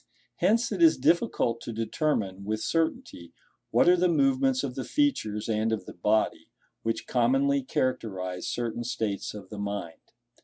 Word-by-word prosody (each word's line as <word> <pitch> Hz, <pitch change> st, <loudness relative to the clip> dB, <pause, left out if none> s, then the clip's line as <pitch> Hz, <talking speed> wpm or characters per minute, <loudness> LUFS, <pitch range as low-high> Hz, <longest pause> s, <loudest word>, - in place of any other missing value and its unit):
Hence 235 Hz, +2 st, +2 dB
it -, -, -2 dB
is 330 Hz, -1 st, +6 dB
difficult 165 Hz, -, +1 dB
to -, -, -6 dB
determine, 110 Hz, -, -1 dB
with 110 Hz, +2 st, -2 dB
certainty, 165 Hz, -, -2 dB, 0.4 s
what -, -, +3 dB
are 180 Hz, -, +7 dB
the 180 Hz, 0 st, +2 dB
movements 135 Hz, -4 st, +2 dB
of 135 Hz, -3 st, -3 dB
the 130 Hz, -, -4 dB
features 110 Hz, -, 0 dB
and 110 Hz, 0 st, 0 dB
of 105 Hz, -4 st, -2 dB
the -, -, -9 dB
body, 105 Hz, +5 st, 0 dB, 0.3 s
which 115 Hz, 0 st, -2 dB
commonly 135 Hz, +3 st, +2 dB
characterize 95 Hz, -9 st, -2 dB
certain 120 Hz, 0 st, -3 dB
states 110 Hz, -4 st, -3 dB
of 100 Hz, -3 st, -10 dB
the 105 Hz, -, -7 dB
mind. 100 Hz, -5 st, -5 dB
115 Hz, 155 wpm, -27 LUFS, 105-140 Hz, 0.4 s, are